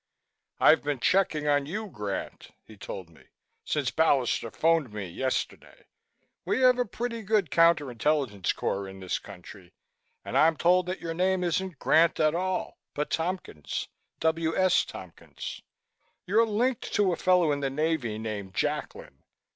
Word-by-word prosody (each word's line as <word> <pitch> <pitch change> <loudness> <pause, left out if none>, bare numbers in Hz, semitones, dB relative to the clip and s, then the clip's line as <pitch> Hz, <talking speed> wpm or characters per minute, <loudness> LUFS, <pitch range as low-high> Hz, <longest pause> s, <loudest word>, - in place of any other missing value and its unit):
"I've - - +6
been 145 -2 -2
checking 170 -2 +1
on 145 -1 +2
you, 210 +7 -4
Grant," 105 - -6 0.2
he 110 - -14
told 95 -2 -7
me, 80 - -20 0.4
"since - - -1
Ballister 135 -7 +2
phoned 165 -6 +1
me 105 -2 -5
yesterday. 130 +10 -4 0.6
We - - 0
have 250 -1 +5
a 245 - +2
pretty 230 +2 -4
good 205 -6 +1
counter 165 -5 +4
intelligence 120 - 0
corps 100 0 -2
in 95 0 -10
this 95 -1 -2
country 90 0 -13 0.5
and - - -5
I'm 160 0 +4
told 180 +1 +3
that 185 - -4
your 165 -1 -4
name 185 +2 +1
isn't 180 0 -1
Grant 165 +1 +3
at 155 -1 +3
all, 185 +2 -2 0.2
but 150 +1 -2
Tompkins 165 - -3 0.3
W. 160 0 0
S. 185 -1 +3
Tompkins. 90 -3 -9 0.6
You're 225 +5 +3
linked 235 +3 -1
to 200 -4 +3
a - - 0
fellow 180 -4 +3
in 145 - 0
the 140 -1 -1
Navy 140 -6 -1
named 105 -3 -5
Jacklin. - - -3
160 Hz, 155 wpm, -27 LUFS, 120-185 Hz, 0.6 s, I've